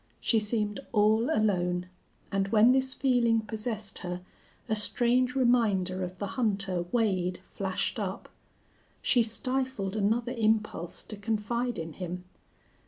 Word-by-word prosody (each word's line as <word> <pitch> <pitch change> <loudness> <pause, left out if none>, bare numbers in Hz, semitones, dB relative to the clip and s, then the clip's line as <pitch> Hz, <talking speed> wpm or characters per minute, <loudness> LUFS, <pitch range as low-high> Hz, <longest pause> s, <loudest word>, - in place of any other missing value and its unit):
She 225 - +2
seemed 210 -1 -1
all 215 +4 +3
alone, 180 - +1 0.4
and 195 -1 +1
when 225 +3 +5
this 260 0 +1
feeling 240 -4 +3
possessed 215 -1 -3
her 180 0 -5 0.5
a - - 0
strange 245 +4 +2
reminder 210 -8 +2
of 180 0 -6
the 200 - -3
hunter 195 -5 -1
Wade 185 -7 +1
flashed 195 +3 -2
up. 195 -2 -4 0.8
She 245 - +4
stifled 235 -3 -1
another 225 +4 +1
impulse 215 -6 0
to 215 - -7
confide 225 +3 -2
in 160 -1 -5
him. 180 0 -5
215 Hz, 125 wpm, -29 LUFS, 190-235 Hz, 0.8 s, when